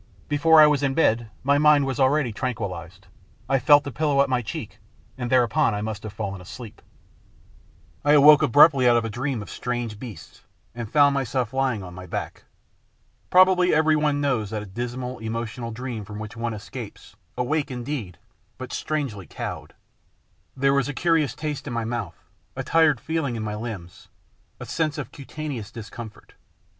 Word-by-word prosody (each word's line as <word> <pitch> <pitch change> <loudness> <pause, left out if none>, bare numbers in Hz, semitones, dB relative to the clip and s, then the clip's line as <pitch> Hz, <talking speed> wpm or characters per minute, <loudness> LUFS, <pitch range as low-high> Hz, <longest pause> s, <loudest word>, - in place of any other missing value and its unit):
Before 160 +2 +5
I 155 - +10
was 150 -2 +3
in 135 -1 0
bed 120 -8 +2
my 140 +2 +3
mind 150 -2 +5
was 135 -2 -3
already 135 -2 +2
tran 125 +2 -2
quillised. 90 -3 -6 0.5
I 135 - +2
felt 145 +1 +6
the 140 - -6
pillow 140 +1 +2
at 140 - -4
my 125 -1 +2
cheek, 110 - -7 0.4
and 125 -2 -4
there 130 -1 +5
upon 120 0 +1
I 105 - -3
must 110 -2 -4
have 110 - -7
fallen 100 -2 -5
asleep. 110 +4 -10 1.2
I 145 - +4
awoke 150 0 +8
abruptly 140 -1 +6
out 120 - +5
of 115 - 0
a 115 - -4
dream 125 0 -3
of - - -12
strange 120 -3 -4
beasts, 110 -11 -10 0.3
and 115 -2 -6
found 145 -1 +5
myself 130 -3 -1
lying 130 -6 0
on 90 -1 -9
my 90 +1 -9
back. - - -5 0.8
Probably 180 -1 +5
everyone 155 -2 +2
knows 125 -8 0
that 105 -3 -6
dismal, 125 +2 -4
emotional 115 +1 -4
dream 120 -1 -5
from 105 0 -9
which 105 0 -7
one 115 -1 -3
escapes, 100 - -9 0.2
awake 145 +4 0
indeed, 120 - -5 0.4
but - - -7
strangely 130 - -3
cowed. - - -7 0.8
There 135 +1 +3
was 140 0 +1
a 145 - -5
curious 160 -3 +1
taste 150 -2 -4
in 125 - -4
my 115 -1 -2
mouth, 110 -8 -4 0.4
a - - -3
tired 160 -5 +3
feel 160 +3 -2
ing 125 -3 -2
in 110 - -4
my 105 -1 -3
limbs, 105 -6 -7 0.5
a - - -7
sense 160 -1 -1
of 140 -6 -6
cutaneous 140 -6 -6
discomfort. 115 -1 -10
125 Hz, 175 wpm, -24 LUFS, 110-145 Hz, 1.2 s, I